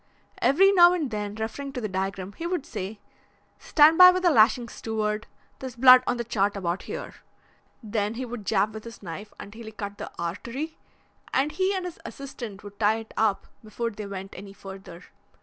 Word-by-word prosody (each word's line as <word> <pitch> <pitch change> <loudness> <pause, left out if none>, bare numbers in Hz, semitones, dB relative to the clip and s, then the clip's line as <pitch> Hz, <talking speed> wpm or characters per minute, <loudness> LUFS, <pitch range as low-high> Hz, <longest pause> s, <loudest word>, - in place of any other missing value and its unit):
Every 385 +8 +5
now 350 -2 +7
and 310 -8 -2
then, 210 -1 -4
referring 250 +6 -5
to 255 - -3
the 215 - -2
diagram, 190 0 -3
he 335 - -5
would 350 -5 -2
say: 210 -1 -6 0.6
'Stand 315 +2 +5
by 365 0 +12
with 365 0 +1
the 350 - +5
lashings, 235 -1 +4
steward. 215 -1 -2 0.3
There's 260 -1 -7
blood 255 +1 +8
on - - +1
the 235 - -2
chart 205 -3 0
about 180 -1 -2
here.' - - -6 0.7
Then 210 0 -2
he 255 +2 -4
would 240 -3 -7
jab 205 +1 +1
with 220 0 -8
his 230 -2 -11
knife 195 +4 -7
until 220 +3 -10
he 220 - -8
cut 205 -1 -7
the - - -6
artery, 235 - -5 0.5
and 275 +3 +1
he 380 +3 0
and 370 -1 -3
his 355 - -7
assistant 240 -7 -8
would 205 0 -12
tie 215 0 +3
it 225 -1 -10
up 215 -3 +1 0.2
before 230 +2 -4
they 210 -1 -7
went 195 -1 -7
any 195 +1 -10
further. 190 -3 -11
220 Hz, 195 wpm, -26 LUFS, 200-270 Hz, 0.7 s, by